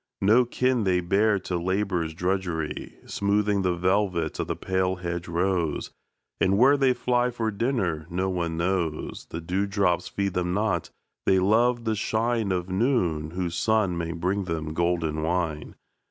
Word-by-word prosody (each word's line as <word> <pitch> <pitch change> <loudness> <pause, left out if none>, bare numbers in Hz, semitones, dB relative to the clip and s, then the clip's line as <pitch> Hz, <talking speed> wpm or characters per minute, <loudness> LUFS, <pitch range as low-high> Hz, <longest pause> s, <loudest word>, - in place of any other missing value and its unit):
No 115 +6 +5
kin 125 0 +1
they 90 -2 +2
bear 100 +4 +2
to 90 - -2
labour's 90 -3 -1
drudgery, 90 -3 -2
Smoothing 100 0 +1
the 90 -2 +1
velvet 90 -2 0
of - - -1
the - - -2
pale 95 0 0
hedge 85 -1 -4
rose; 85 -2 -1 0.5
And 95 +1 +3
where 135 +6 +6
they 135 -2 +3
fly 125 0 +1
for 115 -2 -2
dinner 100 - -1
no 90 +2 -1
one 85 -3 -2
knows 85 -3 -2
The 85 - -5
dew 95 +4 -1
drops 100 -3 +1
feed 100 -2 -2
them 90 0 -1
not 105 -5 0 0.4
they 95 - +5
love 115 +5 +3
the 110 - +1
shine 110 0 0
Of 90 -1 -1
noon, 95 - 0
whose 90 0 -3
sun 105 -1 +2
may 85 -1 -3
bring 90 +4 -1
them 80 -3 -3
golden 85 -2 0
wine. 80 -2 -2
95 Hz, 160 wpm, -26 LUFS, 85-105 Hz, 0.5 s, where